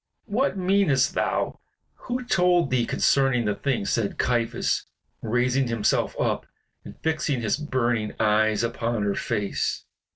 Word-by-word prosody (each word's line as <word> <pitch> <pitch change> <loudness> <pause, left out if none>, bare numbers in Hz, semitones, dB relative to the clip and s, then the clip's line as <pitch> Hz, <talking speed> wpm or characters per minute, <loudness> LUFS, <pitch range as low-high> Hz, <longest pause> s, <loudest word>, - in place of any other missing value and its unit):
"What 235 +2 0
meanest 185 -8 +2
thou? - - -1 0.3
Who 250 0 -5
told 180 - +2
thee 125 -2 +1
concerning 135 -4 +2
the 105 - +1
thing?" 125 -2 -1
said 105 -1 -1
Caiaphas, 120 -2 0 0.3
raising 125 +3 +1
himself 115 -3 0
up - - -1 0.4
and - - -11
fixing 155 -5 0
his 110 -2 +1
burning 120 -7 -1
eyes 110 0 +2
upon 115 -1 -1
her 100 -1 +1
face. 100 0 -2
125 Hz, 130 wpm, -25 LUFS, 110-155 Hz, 0.4 s, meanest